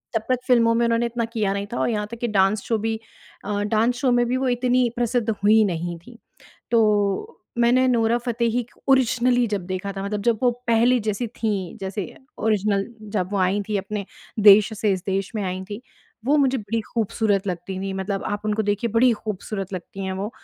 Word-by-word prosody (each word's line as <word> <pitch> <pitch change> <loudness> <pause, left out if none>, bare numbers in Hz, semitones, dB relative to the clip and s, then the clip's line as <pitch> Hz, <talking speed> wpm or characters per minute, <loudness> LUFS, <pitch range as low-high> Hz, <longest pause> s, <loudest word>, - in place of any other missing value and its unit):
तब 225 - +2
तक 255 -1 +2
फ़िल्मों 230 -2 +4
में 235 0 +2
उन्होंने 235 0 +2
इतना 235 0 -2
किया 220 -4 -1
नहीं 200 0 -3
था - - -2
और - - +1
यहाँ 210 -2 -1
तक 235 - -6
कि 240 - -1
डांस 200 -1 +2
शो 225 - 0
भी 220 +1 -2 0.5
अ, 205 0 -1
डांस 220 +3 +1
शो 255 -1 +1
में 240 0 +3
भी 250 +2 0
वो 265 0 0
इतनी 245 0 +2
प्रसिद्ध 240 -1 0
हुई 215 +1 +4
नहीं 175 -2 -3
थी। 230 +8 -15 0.5
तो 215 - +2 0.2
मैंने 245 +2 +4
नोरा 230 -1 +2
फतेही 235 0 0
क - - -27
ओरिजिनली 250 -2 +3
जब 205 -4 -3
देखा 185 +2 -4
था 195 0 -5
मतलब 200 0 -3
जब 230 -1 +2
वो 250 - +5 0.2
पहली 235 +2 +4
जैसी 215 +3 -1
थी 220 -1 -2 0.3
जैसे 195 +1 -3 0.3
ओरिज़िनल 205 -2 +1 0.3
जब 185 -3 -1
वो 200 - 0
आई 190 +2 +2
थी 210 - 0
अपने 200 +1 -3 0.4
देश 205 +1 +7
से, 210 -1 +2
इस 185 -2 -3
देश 195 0 -1
में 215 - -2
आई 185 0 -3
थी 205 +2 -5 0.4
वो 285 +4 +3
मुझे 270 -2 +2
बड़ी 220 +1 -2
खूबसूरत 215 -3 0
लगती 185 +1 -4
थी। 195 0 -3
मतलब 190 +1 -3
आप 205 +1 -3
उनको 215 +1 0
देखिए 205 +3 -1
बड़ी 245 +2 +5
खूबसूरत 205 -2 -5
लगती 190 +2 -6
हैं 190 - -2
वो, 195 +3 -4
215 Hz, 210 wpm, -23 LUFS, 200-235 Hz, 0.5 s, देश